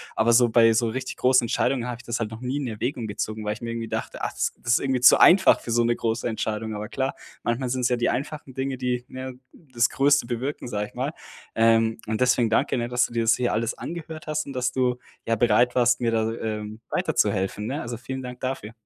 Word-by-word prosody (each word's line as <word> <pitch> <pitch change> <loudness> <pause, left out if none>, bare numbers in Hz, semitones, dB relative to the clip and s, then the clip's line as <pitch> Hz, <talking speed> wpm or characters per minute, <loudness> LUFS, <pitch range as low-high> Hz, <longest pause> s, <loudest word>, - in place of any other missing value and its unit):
Aber 115 +2 +3
so 120 0 +5
bei 115 0 +5
so 115 +1 +2
richtig 130 +3 -4
großen 130 -1 +4
Entscheidungen 125 +2 0
habe 125 -1 -4
ich - - -13
das 120 0 -3
halt 110 -2 -3
noch 110 +1 -9
nie 130 +2 -2
in 145 - -2
Erwägung 120 +3 -3
gezogen, 110 +1 -4
weil 105 - 0
ich 115 - -12
mir 115 - -4
irgendwie 115 -1 -4
dachte: - - -4
„Ach, - - -1
das - - -1
ist 120 0 +3
irgendwie 135 -2 0
zu 125 - +8
einfach 190 +2 +7
für - - -10
so 120 +1 +3
'ne 120 0 +2
große 115 +1 -2
Entscheidung.“ 110 -1 -3
Aber 105 0 -5
klar, 135 +2 -2 0.3
manchmal 120 +2 -1
sind 130 +1 -1
es 125 - +2
ja 125 - +1
die 120 - +1
einfachen 140 -1 -4
Dinge, 130 -1 -3
die 125 -1 -2
ja 130 0 -6 0.2
das 125 -7 -1
größte 140 -1 +3
bewirken, 125 +4 -4
sage 105 -3 -3
ich - - -21
mal. - - -2 0.4
Ähm, 115 0 +3
und 110 0 -2
deswegen 125 -2 +3
danke 115 +2 +1
ne, 120 - -2
dass 125 0 +2
du - - -9
dir 115 - 0
das 115 0 +4
hier 125 -1 0
alles 115 +2 -1
angehört 160 -2 -7
hast 155 0 -2
und 140 - -6
dass 125 -1 -1
du, 125 -1 0 0.3
ja, 115 - +2
bereit 120 +2 +3
warst, 125 0 +3
mir 120 - +2
da, 110 -1 0
ähm, 110 -1 -5
weiterzuhelfen, 100 +1 0
ne? 140 +5 -3
Also, 120 0 -5
vielen 130 +3 -6
Dank 125 0 -8
dafür. 130 -5 -4
120 Hz, 245 wpm, -25 LUFS, 115-130 Hz, 0.4 s, zu